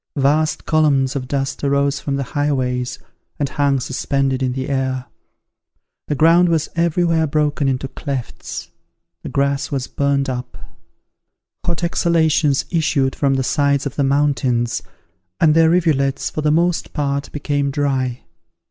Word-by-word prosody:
Vast 150 Hz, +3 st, +1 dB
columns 145 Hz, -4 st, +2 dB
of 130 Hz, -2 st, -3 dB
dust 135 Hz, +1 st, -2 dB
arose 140 Hz, 0 st, +1 dB
from 140 Hz, -, -2 dB
the 140 Hz, -, -1 dB
highways, 130 Hz, -4 st, -1 dB, 0.4 s
and 145 Hz, -, 0 dB
hung 140 Hz, -1 st, +1 dB
suspended 135 Hz, +1 st, -1 dB
in 130 Hz, -1 st, 0 dB
the 130 Hz, 0 st, -3 dB
air; 130 Hz, -2 st, -1 dB, 1.0 s
the 150 Hz, -, -1 dB
ground 165 Hz, +4 st, +5 dB
was 160 Hz, -2 st, 0 dB
every 170 Hz, +1 st, +1 dB
where 165 Hz, -2 st, +2 dB
broken 150 Hz, -1 st, 0 dB
into 135 Hz, 0 st, -1 dB
clefts; 135 Hz, -2 st, -6 dB, 0.5 s
the -, -, -6 dB
grass 140 Hz, 0 st, 0 dB
was 135 Hz, -3 st, -2 dB
burnt 140 Hz, 0 st, 0 dB
up; 125 Hz, -1 st, -5 dB, 1.1 s
hot 175 Hz, 0 st, -2 dB
exhalations 160 Hz, -4 st, +2 dB
issued 155 Hz, -6 st, +1 dB
from 135 Hz, -2 st, +1 dB
the 135 Hz, -, 0 dB
sides 140 Hz, 0 st, +1 dB
of 140 Hz, -, -4 dB
the 140 Hz, -, +1 dB
mountains, 135 Hz, -4 st, +1 dB, 0.6 s
and 155 Hz, -2 st, +5 dB
their 165 Hz, 0 st, +5 dB
rivulets, 155 Hz, -6 st, +1 dB
for 155 Hz, -, -3 dB
the 150 Hz, -, +2 dB
most 170 Hz, +2 st, +1 dB
part, 140 Hz, -1 st, -2 dB
became 145 Hz, -1 st, -1 dB
dry. 135 Hz, -3 st, -1 dB
140 Hz, 145 wpm, -19 LUFS, 135-155 Hz, 1.1 s, ground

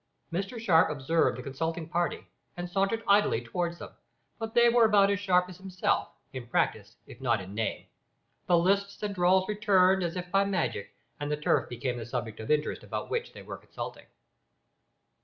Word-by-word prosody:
Mr 195 Hz, +7 st, -3 dB
Sharp 175 Hz, -8 st, +4 dB
observed 150 Hz, -1 st, +1 dB
the 125 Hz, -, -7 dB
consulting 160 Hz, +5 st, -3 dB
party, 175 Hz, +1 st, -1 dB, 0.3 s
and 175 Hz, 0 st, -4 dB
sauntered 195 Hz, +5 st, 0 dB
idly 205 Hz, -, +4 dB
towards 170 Hz, +9 st, -3 dB
them, -, -, -9 dB, 0.5 s
but 225 Hz, 0 st, -5 dB
they 240 Hz, 0 st, +6 dB
were 235 Hz, -1 st, +5 dB
about 200 Hz, -2 st, +5 dB
as 200 Hz, -, 0 dB
sharp 180 Hz, -3 st, +2 dB
as 180 Hz, -1 st, -11 dB
himself, 185 Hz, -1 st, -1 dB, 0.3 s
in 130 Hz, -2 st, -7 dB
practice 105 Hz, -2 st, -1 dB
if 120 Hz, -, -13 dB
not 120 Hz, -4 st, +2 dB
in 95 Hz, +1 st, -9 dB
name. 110 Hz, +1 st, -2 dB, 0.6 s
The 175 Hz, -, +5 dB
lisps 200 Hz, +4 st, +1 dB
and 205 Hz, -1 st, -2 dB
drawls 185 Hz, 0 st, +3 dB
returned 195 Hz, -3 st, +3 dB
as 170 Hz, -1 st, -2 dB
if 180 Hz, 0 st, -5 dB
by 195 Hz, 0 st, +4 dB
magic, 185 Hz, -, -2 dB, 0.2 s
and 145 Hz, 0 st, -3 dB
the 150 Hz, -, 0 dB
turf 150 Hz, -, +1 dB
became 120 Hz, +1 st, -3 dB
the 115 Hz, -, -7 dB
subject 120 Hz, -3 st, -4 dB
of 110 Hz, -, -7 dB
interest 150 Hz, 0 st, 0 dB
about -, -, -5 dB
which 470 Hz, +1 st, -2 dB
they -, -, -11 dB
were -, -, -7 dB
consulting. -, -, -8 dB
175 Hz, 185 wpm, -29 LUFS, 135-200 Hz, 0.6 s, they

